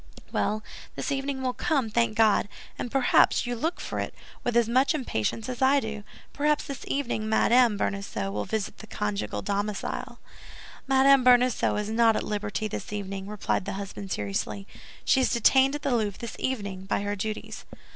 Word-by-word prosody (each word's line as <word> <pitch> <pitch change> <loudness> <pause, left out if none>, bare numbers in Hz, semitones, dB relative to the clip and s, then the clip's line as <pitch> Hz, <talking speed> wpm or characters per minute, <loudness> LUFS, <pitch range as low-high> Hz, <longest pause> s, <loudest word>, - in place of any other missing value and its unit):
"Well, 215 +1 0 0.3
this - - -3
evening 275 -1 -2
will 255 -1 0
come, 275 -9 0
thank 230 0 +1
God! 215 -2 +4 0.3
And 245 - -3
perhaps 265 0 +4
you 245 0 -2
look 320 +9 -2
for - - -4
it - - -4 0.3
with 240 -1 +1
as 235 -2 +4
much 260 +6 +3
impatience 225 - -2
as 250 -1 -5
I 270 +2 +5
do; 220 -4 -5 0.3
perhaps 300 +1 +1
this 275 -3 -7
evening 240 -6 -2
Madame 235 0 +4
Bonacieux 200 - -2
will 105 +1 -3
visit 220 -3 -3
the 220 - -10
conjugal 105 - -3
domicile." 205 0 -3 0.7
"Madame 270 0 +5
Bonacieux 250 -1 +4
is 210 +1 -2
not 225 0 +4
at - - -1
liberty 210 +1 -2
this 210 - -6
evening," 195 -1 -5
replied 210 -2 -1
the 200 - -3
husband, 195 0 -6
seriously; 105 - -3 0.4
"she 265 - +4
is - - +2
detained 265 +4 +4
at 295 - -6
the 260 - +1
Louvre 210 -4 -1
this 235 -2 -7
evening 200 -7 -3
by 200 - 0
her 205 0 -1
duties." 215 +2 -5
220 Hz, 175 wpm, -27 LUFS, 205-260 Hz, 0.7 s, I